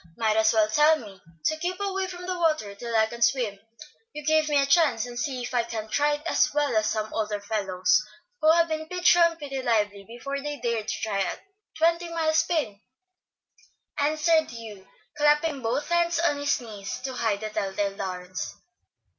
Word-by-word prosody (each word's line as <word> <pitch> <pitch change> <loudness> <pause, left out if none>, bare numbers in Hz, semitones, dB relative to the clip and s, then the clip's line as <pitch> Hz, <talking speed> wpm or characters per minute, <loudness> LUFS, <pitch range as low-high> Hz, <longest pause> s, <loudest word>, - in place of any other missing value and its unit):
Might 220 -1 +1
as 220 0 +4
well 220 -2 +3
tell 300 +8 +5
me 200 -7 -12 0.2
to 315 - +2
keep 360 +3 -3
away 385 -1 -1
from 360 -1 -8
the 365 0 -2
water 310 - 0
till 230 +3 -5
I 220 - +5
can 235 +2 -9
swim. 230 -6 +1 0.5
You 300 -1 -7
give 310 0 +3
me 290 -1 +3
a 275 - +3
chance 280 -7 +3
and 240 -1 -7
see 255 -2 -2
if 240 - -6
I 245 - +3
can't 225 -1 -3
ride 295 0 +1
as 340 - +2
well 290 -5 +1
as 215 0 +2
some 215 0 -3
older 210 -1 -1
fellows 195 -3 +1 0.4
who 310 - +6
have 335 0 +4
been 315 -1 -3
pitched 360 +1 +4
round 335 -1 +4
pretty 275 -4 -5
lively 210 -4 0
before 260 +6 -6
they 295 0 -5
dared 230 -3 -2
to - - -3
try 210 -3 -1
a 195 - -1 0.4
twenty 335 +1 +2
mile 325 -1 0
spin," 310 -11 0 1.2
answered 310 +2 +2
Hugh, 220 -5 -10 0.3
clapping 295 -1 +2
both 250 +7 -2
hands 345 0 +2
on 335 -4 +2
his 285 0 +1
knees 210 -5 -7
to 260 0 -4
hide 220 -4 -1
the 215 0 -4
tell 195 -2 -2
tale 200 0 -2
darns. 185 -1 -5
255 Hz, 195 wpm, -26 LUFS, 215-315 Hz, 1.2 s, who